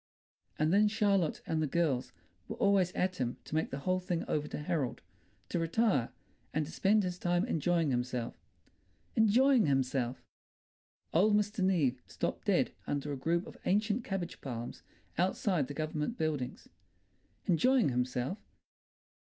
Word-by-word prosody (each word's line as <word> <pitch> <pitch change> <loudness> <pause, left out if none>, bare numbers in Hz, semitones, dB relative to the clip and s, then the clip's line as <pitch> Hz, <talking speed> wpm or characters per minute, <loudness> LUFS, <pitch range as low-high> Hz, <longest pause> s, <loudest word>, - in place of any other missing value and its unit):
And 155 +3 +2
then 210 +2 +5
Charlotte 200 -5 +1
and 160 -1 0
the 155 - +1
girls 145 -5 0 0.4
were - - -5
always 195 -3 +3
at 185 0 0
him 125 -1 -2
to - - -10
make 160 +1 +1
the 135 - -4
whole 185 +4 +1
thing 180 -2 -2
over 150 0 -1
to - - -5
Harold, 150 -3 -2 0.5
to - - -1
retire, 165 - +2 0.5
and 155 0 +1
to 155 - -9
spend 205 +2 +3
his 180 -1 -3
time 175 +2 +1
enjoying 165 - +1
himself. 125 -1 -2 0.8
Enjoying 230 - +5
himself! 130 -2 0 0.9
Old 205 +6 +5
Mr. 210 -1 +1
Neave 150 -10 +2
stopped - - -3
dead - - +2 0.2
under 145 0 -2
a - - -2
group 170 +6 0
of - - -12
ancient 215 +4 +1
cabbage 190 -5 -4
palms 120 -3 -6 0.4
outside 180 -4 +1
the 145 - -7
Government 155 - -2
buildings! 145 - -2 0.8
Enjoying 245 - +4
himself! 125 - -1
165 Hz, 145 wpm, -32 LUFS, 140-195 Hz, 0.9 s, then